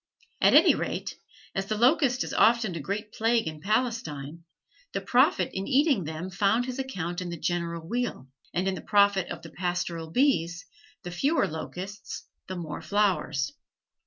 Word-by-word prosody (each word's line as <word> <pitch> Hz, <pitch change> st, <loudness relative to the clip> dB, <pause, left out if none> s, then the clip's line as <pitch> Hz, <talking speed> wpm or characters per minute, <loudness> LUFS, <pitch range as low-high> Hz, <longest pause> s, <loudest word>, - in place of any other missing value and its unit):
At -, -, +6 dB
any -, -, +8 dB
rate, -, -, -4 dB, 0.3 s
as 195 Hz, 0 st, -2 dB
the 215 Hz, -, -1 dB
locust 255 Hz, +1 st, +3 dB
is -, -, -6 dB
often 225 Hz, -4 st, +4 dB
a -, -, -3 dB
great 210 Hz, +7 st, -4 dB
plague 225 Hz, +1 st, +2 dB
in 155 Hz, -1 st, -6 dB
Palestine, 170 Hz, -, -2 dB, 0.5 s
the -, -, -1 dB
prophet -, -, +3 dB
in 190 Hz, +1 st, -3 dB
eating 270 Hz, -, +3 dB
them 160 Hz, +4 st, -5 dB
found 205 Hz, +6 st, +2 dB
his 255 Hz, +1 st, -5 dB
account 185 Hz, -10 st, -3 dB
in 180 Hz, -, -4 dB
the 170 Hz, -, -5 dB
general 170 Hz, -1 st, -2 dB
weal, 240 Hz, -, -2 dB, 0.2 s
and 180 Hz, +2 st, -1 dB
in 190 Hz, -, +1 dB
the -, -, -5 dB
profit 200 Hz, -3 st, +3 dB
of -, -, -6 dB
the 165 Hz, -, -10 dB
pastoral 175 Hz, 0 st, -3 dB
bees; 175 Hz, -, +1 dB, 0.4 s
the 175 Hz, -, -6 dB
fewer 280 Hz, -, +2 dB
locusts, 185 Hz, +5 st, -6 dB, 0.2 s
the 185 Hz, -, -5 dB
more 165 Hz, -3 st, -5 dB
flowers. 160 Hz, -6 st, 0 dB
190 Hz, 165 wpm, -27 LUFS, 170-230 Hz, 0.5 s, any